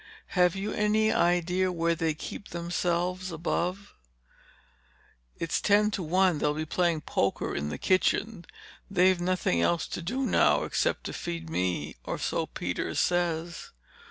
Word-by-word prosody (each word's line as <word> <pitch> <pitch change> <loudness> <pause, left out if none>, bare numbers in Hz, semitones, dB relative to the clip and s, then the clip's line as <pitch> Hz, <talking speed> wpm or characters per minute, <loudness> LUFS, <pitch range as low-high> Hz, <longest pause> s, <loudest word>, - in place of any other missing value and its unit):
"Have 180 -1 +4
you 200 +2 -3
any 215 +1 +2
idea 180 +2 +2
where 170 -1 +1
they 160 -2 -1
keep 190 - -7
themselves 175 +1 -2
above?" 175 +4 -2 1.4
"It's 165 -2 -1
ten 210 +1 +4
to 195 - -3
one 180 0 +2
they'll 150 0 +1
be 155 +1 -2
playing 170 -1 +1
poker 100 -8 -1
in 70 +1 -2
the - - -4
kitchen. 185 0 +1 0.4
They've 185 -1 +3
nothing 175 - +1
else 170 - +1
to - - -4
do 255 +11 -2
now, - - +3
except - - 0
to - - -5
feed 165 -1 -5
me—or 90 - -2
so - - -1
Peters - - -3
says." 170 -1 0
175 Hz, 140 wpm, -28 LUFS, 165-185 Hz, 1.4 s, Have